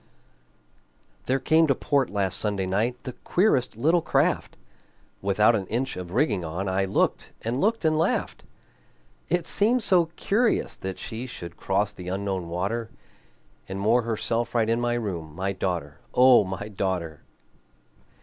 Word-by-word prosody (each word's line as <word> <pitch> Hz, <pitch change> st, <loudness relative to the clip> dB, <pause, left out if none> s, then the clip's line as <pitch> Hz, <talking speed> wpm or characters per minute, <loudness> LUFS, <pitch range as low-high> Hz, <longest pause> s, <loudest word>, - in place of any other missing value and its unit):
There 130 Hz, -, +1 dB
came 160 Hz, +4 st, +3 dB
to 135 Hz, -, +3 dB
port 140 Hz, 0 st, +1 dB
last 100 Hz, -2 st, -1 dB
Sunday 100 Hz, -3 st, -1 dB
night 110 Hz, +6 st, -1 dB
The 130 Hz, -, -5 dB
queerest 135 Hz, -, +2 dB
little 165 Hz, +8 st, +3 dB
craft, -, -, 0 dB, 0.6 s
Without 105 Hz, +4 st, +3 dB
an 95 Hz, -4 st, -2 dB
inch 125 Hz, +4 st, -2 dB
of 90 Hz, -1 st, -7 dB
rigging 110 Hz, -, +1 dB
on; 85 Hz, +5 st, -4 dB
I 95 Hz, +1 st, +1 dB
looked 95 Hz, -, 0 dB
and 120 Hz, +4 st, -1 dB
looked 220 Hz, -2 st, +1 dB
and 155 Hz, 0 st, +3 dB
laughed. 165 Hz, -, -1 dB, 0.9 s
It 175 Hz, +1 st, +1 dB
seemed 230 Hz, +4 st, +2 dB
so 180 Hz, -4 st, +4 dB
curious 225 Hz, +7 st, +1 dB
that 95 Hz, 0 st, -5 dB
she 115 Hz, +3 st, -6 dB
Should 85 Hz, -8 st, -8 dB
cross 100 Hz, +2 st, 0 dB
the 90 Hz, -3 st, -10 dB
Unknown 95 Hz, -2 st, -3 dB
water, 100 Hz, +7 st, -2 dB, 0.8 s
And 95 Hz, +1 st, -4 dB
moor 110 Hz, +5 st, +3 dB
herself 115 Hz, +1 st, -2 dB
right 115 Hz, -1 st, +2 dB
in 115 Hz, +1 st, +1 dB
my 120 Hz, 0 st, 0 dB
room, 85 Hz, -9 st, -4 dB
My 95 Hz, +2 st, -1 dB
daughter, 85 Hz, -6 st, -3 dB, 0.2 s
O 125 Hz, -2 st, +7 dB
my 95 Hz, +2 st, -5 dB
daughter! 95 Hz, -6 st, -3 dB
110 Hz, 150 wpm, -25 LUFS, 95-130 Hz, 0.9 s, O